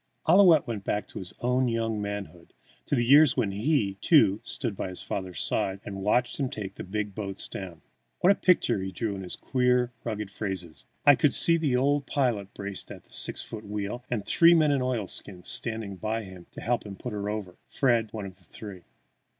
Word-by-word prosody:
Ouillette 175 -3 +7
went 110 -4 -4
back 105 +1 -1
to - - -7
his 95 -1 -7
own 125 +1 +2
young 115 -2 -1
manhood, 100 -4 -6 0.3
to - - +1
the 120 -2 +1
years 140 +1 +6
when 110 -6 +1
he, 105 -3 0
too, 110 - +5
stood 120 -6 -4
by 95 - -4
his 90 - -7
father's 95 -2 -4
side 95 0 -1
and 100 -1 -6
watched 120 +7 +1
him 135 -2 0
take 100 -4 -6
the - - -7
big 105 +1 -3
boats 100 -2 -4
down. 90 -4 -8 0.4
What 185 - +6
a - - +4
picture 180 - +3
he 95 0 -4
drew 110 +1 -2
in 95 - -6
his 90 - -4
queer, 125 -1 +1
rugged 105 -3 -4
phrases! 95 -6 -5 0.2
I 145 - +9
could 140 +1 +3
see 170 - +5
the 155 -6 +1
old 140 +2 +1
pilot 115 -8 0
braced 100 -1 -6
at - - -10
the - - -18
six - - -2
foot 110 -1 -8
wheel, 105 +3 -4
with 110 -5 -2
three 170 +9 +6
men 155 -3 +4
in 140 -2 +1
oilskins 105 -6 -3
standing 110 -4 -3
by 110 +3 -2 0.3
to - - -10
help 120 0 0
him 100 -2 -8
put 120 +4 -6
her 100 0 -3
over, 105 -4 -5
Fred 120 -5 +1
one 105 -3 -5
of 95 -1 -9
the 95 - -23
three. 95 -2 -10
110 Hz, 205 wpm, -27 LUFS, 100-125 Hz, 0.4 s, I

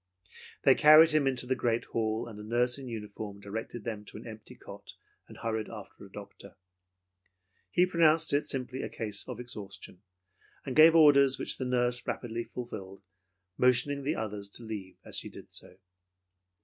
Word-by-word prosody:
They - - +7
carried 155 +2 +7
him 150 -3 +2
into 125 -2 -1
the 130 +1 0
great 120 -2 -1
hall, 110 -1 -2
and 110 -3 -10
a - - -8
nurse 120 +4 +1
in 135 - -8
uniform 105 -3 -7
directed 110 +3 -6
them 110 -2 -5
to - - -9
an 110 - -11
empty 110 -2 -10
cot - - -12 0.3
and - - -13
hurried 110 -1 -3
after 105 -4 -11
a 100 - -14
doctor. 100 -1 -12 1.1
He 175 - +3
pronounced 165 -3 +4
it 145 - +3
simply 130 -1 -4
a - - -4
case 105 -2 -4
of 125 -2 -7
exhaustion, 105 -6 -9 0.6
and 130 - -4
gave 160 +1 +8
orders 140 -4 +6
which - - -3
the 130 - -2
nurse 125 -1 0
rapidly 115 -1 -3
filled, 100 -6 -8 0.6
motioning 125 +3 +3
the 145 +4 -1
others 105 -2 -4
to 120 - -10
leave 100 -5 -7
as - - -7
she - - -4
did - - -13
so. - - -9
120 Hz, 175 wpm, -30 LUFS, 105-135 Hz, 1.1 s, gave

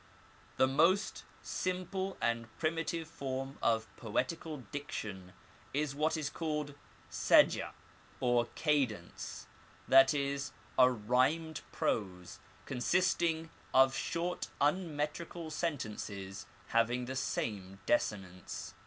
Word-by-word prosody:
The - - +6
most 165 +10 +2 0.2
simple 185 +1 -2
and 115 -1 0
primitive 165 0 -1
form 135 -3 -4
of 110 -1 +2
poetical 135 +5 -2
diction 100 -10 -5 0.4
is 145 -1 0
what 155 +3 +1
is 155 -3 -1
called 150 -2 -2 0.4
seja - - +4 0.5
or 120 -1 +3
cadence, 135 - -1 0.4
that 135 0 +8
is, 140 0 -1 0.3
a 130 0 +8
rhymed 130 +8 +1
prose, 95 -2 -2 0.3
consisting 165 +4 +1 0.2
of 130 0 +6
short 175 +5 -2
uumetrical 155 +1 -1
sentences 105 - -4 0.2
having 120 +2 +2
the 130 +2 -4
same 95 -7 -2
desinence. 95 -5 -1
135 Hz, 95 wpm, -33 LUFS, 115-160 Hz, 0.5 s, that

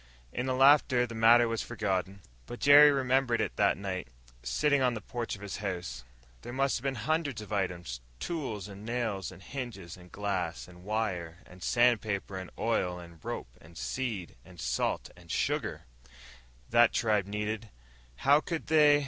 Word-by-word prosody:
In 125 +2 -2
the 130 - 0
laughter, 135 -2 +5
the 115 - -8
matter 115 +1 +6
was 115 -1 -1
forgotten. 95 -4 -2 0.3
But 120 - -7
Jerry 145 +1 +8
remembered 130 -3 +2
it - - -1
that 100 -1 +3
night, 95 -4 -4 0.3
sitting 145 - +2
on 125 -2 +2
the - - -3
porch 120 +4 -4
of 100 - -12
his 100 - -5
house. 90 -11 -4 0.4
There - - -7
must 135 -1 0
be 135 +1 0
hundreds 140 +1 -1
of 105 0 -7
items 90 -10 -2 0.2
tools 125 - -4
and 100 0 -10
nails 110 -5 -2
and 95 0 -13
hinges 115 -11 -7
and 90 0 -16
glass 95 -6 -3
and 90 0 -15
wire 95 -5 -3
and 90 +1 -15
sandpaper 110 -4 +1
and 95 - -8
oil 90 -6 0
and 85 -2 -12
rope - - -5
and 85 +1 -15
seed 110 - -3
and 90 +3 -15
salt - - -1
and - - -17
sugar - - -1 0.9
that 120 0 +6
the - - +1
tribe 105 -4 +2
needed. 105 +2 -3 0.5
How 140 - +4
could 165 -1 -4
they 150 -2 +7
110 Hz, 170 wpm, -30 LUFS, 95-125 Hz, 0.9 s, Jerry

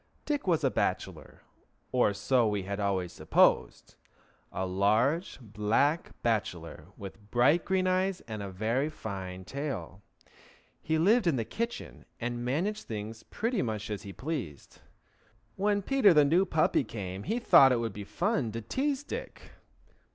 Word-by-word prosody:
Dick 290 -7 -2
was 170 -4 +2
a - - +3
bachelor, - - -3 0.5
or 125 -4 +3
so 110 +4 +2
we 105 -2 -1
had 100 +2 -4
always 95 -3 -1
supposed: - - +2 0.6
a 95 - -2
large 110 - +1
black 115 - 0
bachelor, 85 -9 -2
with 105 +2 -10
bright 140 +9 +3
green 190 -1 +1
eyes, 185 0 +1
and 110 -2 -7
a 100 - -5
very 115 +10 -1
fine 95 -9 -7
tail. 120 - -5 0.8
He 160 - 0
lived 205 +5 +4
in 165 - +3
the 115 -3 -1
kitchen, 235 - -5
and 120 0 -3
managed 180 - -2
things 110 +1 -6
pretty 230 0 -2
much 110 -2 -3
as 105 - -3
he 100 - -8
pleased. 125 - -6 0.7
When 205 +1 +1
Peter, 225 -7 +4
the 150 -1 +6
new 170 +7 +3
puppy, 155 -4 +2
came 100 -4 -6
he 220 - -2
thought 135 - +7
it 125 - +2
would 115 -3 -3
be 105 - -7
fun 170 - -1
to 115 - -4
tease 275 - -1
Dick. - - -8
120 Hz, 150 wpm, -29 LUFS, -, 0.8 s, thought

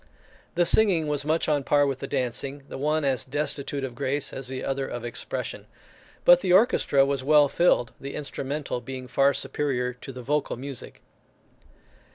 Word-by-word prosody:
The 175 0 +3
singing 185 -5 +4
was 145 -1 0
much 160 +2 +1
on 150 -2 +2
a - - -11
par 145 +1 +3
with 135 -2 -2
the - - -5
dancing, 135 +3 -2
the - - -7
one 150 +1 +1
as 135 -3 +1
destitute 140 0 -2
of 130 -2 -4
grace 135 +4 -1
as 135 -1 -4
the 130 0 -4
other 135 0 -2
of 120 -1 -6
expression; 120 - -4 0.6
but 175 0 +7
the 185 - 0
orchestra 185 - +4
was 140 -1 -1
well 150 +1 +5
filled, 140 -6 +2
the 140 0 -6
instrumental 140 -2 -4
being 130 +1 -7
far 140 +2 +3
superior 125 -4 -1
to 125 +2 -10
the 125 -1 -9
vocal 150 +4 -1
music. 135 -1 -8
140 Hz, 180 wpm, -26 LUFS, 130-150 Hz, 0.6 s, but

